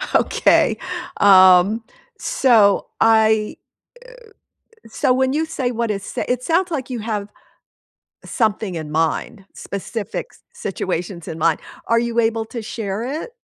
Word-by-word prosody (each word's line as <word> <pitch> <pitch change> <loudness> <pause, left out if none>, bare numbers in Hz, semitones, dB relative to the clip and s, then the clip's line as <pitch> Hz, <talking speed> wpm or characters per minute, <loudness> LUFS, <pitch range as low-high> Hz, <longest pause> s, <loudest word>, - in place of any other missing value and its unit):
Okay, - - +3 0.4
um, 190 +2 +6 0.4
so 220 -6 +3 0.2
I 220 -1 +3 1.3
uh, - - -14
so 255 +3 +1
when 260 +1 +1
you 315 +2 0
say 265 -6 -3
what 235 -2 -1
it - - -1
s - - -10
it 250 0 -1
sounds 350 +5 +1
like 270 -5 -3
you 250 -2 -4
have 210 -2 -4 1.0
something 215 -4 -1
in 155 -2 -6
mind, 165 +6 -1
specific 200 +2 -5
s - - -22
situations 180 -2 -4
in 160 - -6
mind. 160 0 +1 0.3
Are 230 - +3
you 235 0 0
able 225 0 0
to 235 +1 -6
share 215 -2 -4 0.2
it? - - -9
220 Hz, 140 wpm, -20 LUFS, 195-240 Hz, 1.3 s, um